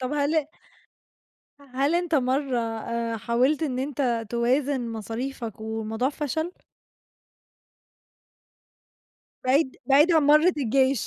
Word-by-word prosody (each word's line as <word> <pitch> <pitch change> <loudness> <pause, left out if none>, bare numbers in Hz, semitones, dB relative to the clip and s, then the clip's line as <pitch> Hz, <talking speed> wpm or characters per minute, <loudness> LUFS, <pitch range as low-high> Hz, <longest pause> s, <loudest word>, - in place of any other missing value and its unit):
طَب 255 +2 -3
هل 295 +1 +1 1.3
هل 280 +5 +1
أنت 345 -2 0
مرّة 265 -1 +1
آآ 230 0 -3
حاولت 250 +8 +1
إن 260 -5 -1
أنت 255 -4 -1
توازن 245 +1 0
مصاريفك 225 +1 -5
والموضوع 220 +2 -2
فشل؟ 310 +4 -3 2.9
بعيد 260 +1 +2
بعيد 290 +5 +5
عن 320 -2 +4
مرّة 305 +5 +5
الجيش، 265 -1 +1
260 Hz, 100 wpm, -25 LUFS, 235-295 Hz, 2.9 s, بعيد